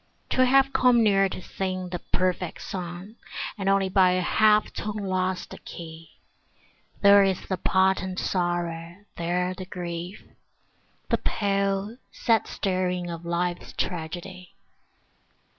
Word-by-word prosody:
To 255 - +4
have 270 +1 +4
come 245 -2 +5
near 195 -2 +4
to 185 - -7
sing 185 -1 -3
the 175 -1 -4
perfect 180 -1 -2
song 180 +4 -6 0.4
And 195 -2 -1
only 195 -1 +3
by 185 -1 +4
a 185 - +1
half 215 +3 +3
tone 210 0 -4
lost 185 -2 -2
the - - -9
key, 165 -1 -10 0.9
There 200 0 +8
is 190 -2 -1
the 185 - -1
potent 190 0 +1
sorrow, 175 -2 -2 0.2
there 180 +2 0
the 185 0 -8
grief, 175 +1 -6 0.9
The - - +2
pale, 200 +1 -1
sad 225 -3 +1
staring 180 -2 -1
of 170 0 -7
life's 175 +1 -2
tragedy. 180 +2 -5
185 Hz, 125 wpm, -26 LUFS, 175-195 Hz, 0.9 s, There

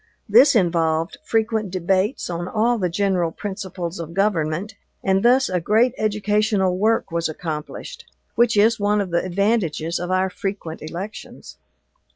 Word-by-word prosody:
This 280 -1 +6
involved 165 -3 +1
frequent 220 -2 0
debates 185 +5 0
on 175 0 -4
all 230 +3 +1
the 180 -2 0
general 185 -2 0
principles 190 -3 -6
of 165 0 -7
government, 195 -1 0 0.3
and 190 0 +2
thus 255 +3 +4
a 180 -2 -1
great 225 +7 +3
educational 210 -2 +1
work 215 0 +1
was 170 -1 -1
accomplished, 155 -1 -6 0.3
which 235 -2 +2
is 220 +2 +4
one 205 +1 +2
of 195 -3 -2
the 170 - +1
advantages 185 -4 0
of 175 +1 -4
our 185 0 +1
frequent 190 -4 -5
elections. 175 +7 -8
190 Hz, 145 wpm, -22 LUFS, 170-215 Hz, 0.3 s, This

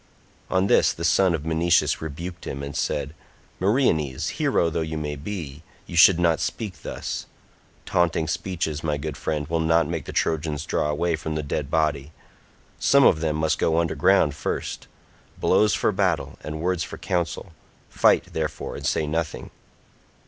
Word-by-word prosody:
On 95 +1 +2
this - - +4
the 85 - -7
son 90 +1 +3
of 75 -2 -6
Menoetius 80 +1 +2
rebuked 85 +3 -6
him 70 - -5
and 70 0 -6
said, 70 +2 -2 0.5
"Meriones, 90 - +1
hero 85 - +1
though 80 0 -1
you 80 0 -3 0.2
be, 75 -2 -6 0.2
you 85 - -8
should 85 +1 +7
not 85 -2 +3
speak 95 - -4
thus; - - -5 0.6
taunting 85 -2 +1
speeches, 80 -5 -3
my 75 -2 0
good 75 0 -5
friend, 75 +1 -2
will 80 +1 0
not 80 -1 +3
make 80 -3 -4
the - - -6
Trojans 75 -2 -1
draw 75 - 0
away 80 +3 0
from 80 0 -5
the 75 - -2
dead 70 0 -3
body; 75 -1 0 0.7
some 140 0 +5
of 80 - +5
them 80 -1 -1
must 80 0 0
go 80 0 +2
under 85 -1 +1
ground 95 -7 +3
first; - - -4 0.5
blows 105 -3 +3
for - - +1
battle, - - -1
and 75 0 -5
words 90 -1 0
for - - -7
council; 85 0 -2 0.4
fight, - - +3
therefore, - - -3
and - - -4
say 80 - +1
nothing." 80 +1 -3
80 Hz, 165 wpm, -24 LUFS, 75-85 Hz, 0.7 s, should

